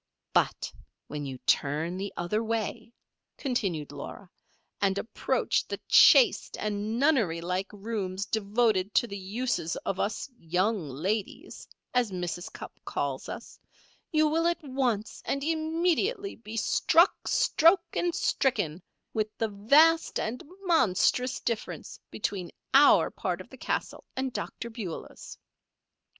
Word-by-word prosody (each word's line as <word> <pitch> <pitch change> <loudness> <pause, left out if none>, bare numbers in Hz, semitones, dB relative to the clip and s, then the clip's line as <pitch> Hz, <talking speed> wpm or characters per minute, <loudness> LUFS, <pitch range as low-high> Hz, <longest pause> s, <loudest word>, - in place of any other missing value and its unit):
"But - - +1 0.4
when 145 -1 -4
you 130 -1 -6
turn 155 +5 +1
the 195 +1 -4
other 210 +6 -1
way," 225 0 -3 0.5
continued 195 - -2
Laura, 160 +6 -9 0.5
"and 195 -1 +2
approach 225 - 0
the - - -4
chaste - - +6
and 210 +1 -2
nunnery 240 - +2
like 180 +3 -2
rooms 200 -2 -3
devoted 210 -2 +1
to - - +4
the 200 -3 -6
uses 200 -3 -2
of 195 - -2
'us 220 +6 -1
young 180 +1 0
ladies,' 190 +10 -4 0.3
as 250 -3 +2
Mrs. 175 -1 -4
Cupp - - -10
calls - - -3
us, - - -8 0.5
you 310 -1 +4
will 325 +2 +2
at 340 -1 -1
once 255 -6 -1
and 275 0 -2
immediately 335 +7 0
be 225 0 -8
struck, 335 - +3
stroke, 335 +3 +4
and 350 0 0
stricken 205 - 0 0.3
with 215 -1 0
the 225 - 0
vast 290 +11 +4
and 235 +3 -3 0.2
monstrous 255 - +2
difference 230 -2 -4
between 185 -4 -3 0.2
our 280 +2 +6
part - - -3
of - - -10
the - - -10
castle - - -3
and 260 -1 -2
Dr. 235 - -5
Beulah's. 205 -8 -7
220 Hz, 130 wpm, -28 LUFS, 185-270 Hz, 0.5 s, chaste